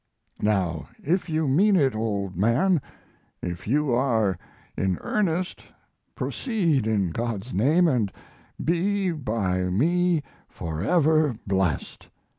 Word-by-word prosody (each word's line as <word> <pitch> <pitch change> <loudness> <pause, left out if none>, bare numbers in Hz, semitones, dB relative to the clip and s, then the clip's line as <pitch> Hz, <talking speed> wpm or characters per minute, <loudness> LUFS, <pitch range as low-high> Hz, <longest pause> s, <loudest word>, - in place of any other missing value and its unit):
Now, 95 -7 0
if 180 +4 0
you 155 -1 0
mean 195 +10 +4
it, 135 -8 +3
old 100 -4 -2
man 130 - +2 0.6
if 85 +1 -5
you 145 +3 +1
are 115 -6 +2 0.4
in 95 -2 0
earnest 185 -3 -1 0.5
proceed, 170 - 0
in 100 -6 +1
God's 115 +2 -3
name, 155 - +4
and 120 -10 +1 0.5
be 185 +3 +1
by 105 - -1
me 165 - +2 0.3
forever 150 - +1
blessed. 95 -7 -1
125 Hz, 105 wpm, -25 LUFS, -, 0.6 s, mean